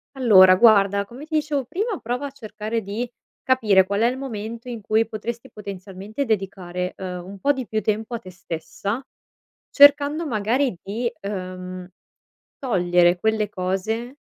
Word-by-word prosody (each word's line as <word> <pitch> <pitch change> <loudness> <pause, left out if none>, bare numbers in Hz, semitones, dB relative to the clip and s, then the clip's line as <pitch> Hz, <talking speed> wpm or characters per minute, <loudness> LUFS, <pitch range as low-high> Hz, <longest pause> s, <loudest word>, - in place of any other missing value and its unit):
Allora 190 -8 +7
guarda, 200 -1 +5
come 250 +8 -11
ti 315 0 -4
dicevo 295 -3 0
prima, 405 - -2
prova 245 +4 -3
a - - -10
cercare 220 -3 -4
di 215 +5 -4 0.4
capire 215 -8 +4
qual 200 +2 -1
è 230 - +5
il 250 +2 -1
momento 230 -2 -6
in 235 -3 -6
cui 220 +2 +1
potresti, 230 +3 -6
potenzialmente, 200 +4 -6
dedicare, 185 -4 -2
uhm, 180 -2 -5
un 195 +1 -10
po' 285 +8 +3
di 260 -4 -5
più 215 0 -1
tempo 220 +3 -2
a - - -4
te 185 -5 -12
stessa, 185 +7 -5 0.6
cercando 285 +2 +5
magari 240 +1 0
di, 230 +5 -2
uhm, 185 -2 -6 0.7
togliere 180 -7 +3
quelle 220 +1 +1
cose 215 +7 -3
215 Hz, 150 wpm, -23 LUFS, 190-250 Hz, 0.7 s, Allora